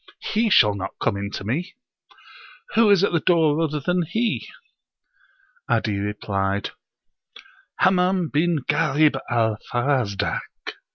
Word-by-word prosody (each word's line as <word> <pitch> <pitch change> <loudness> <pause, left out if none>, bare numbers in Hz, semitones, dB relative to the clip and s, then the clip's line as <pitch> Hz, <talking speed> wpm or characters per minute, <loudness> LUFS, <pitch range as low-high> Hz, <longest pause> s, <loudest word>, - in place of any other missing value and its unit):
He 220 +1 +2
shall 105 - +5
not 95 -1 -6
come - - 0
in 100 0 -4
to 105 - -6
me! 155 - -3 1.0
Who 225 -1 +4
is 200 -2 +5
at - - +2
the 170 - +2
door 160 -3 +2
other 155 -2 -1
than 180 +5 0
he?" 220 +8 -2 1.2
'Adi 105 -2 0
replied, 100 -1 -2 1.0
"Hammam 185 -2 +2
bin 160 -1 0
Ghalib 150 0 +2
al 110 -3 +1
Farazdak." 120 -6 0
150 Hz, 120 wpm, -23 LUFS, -, 1.2 s, shall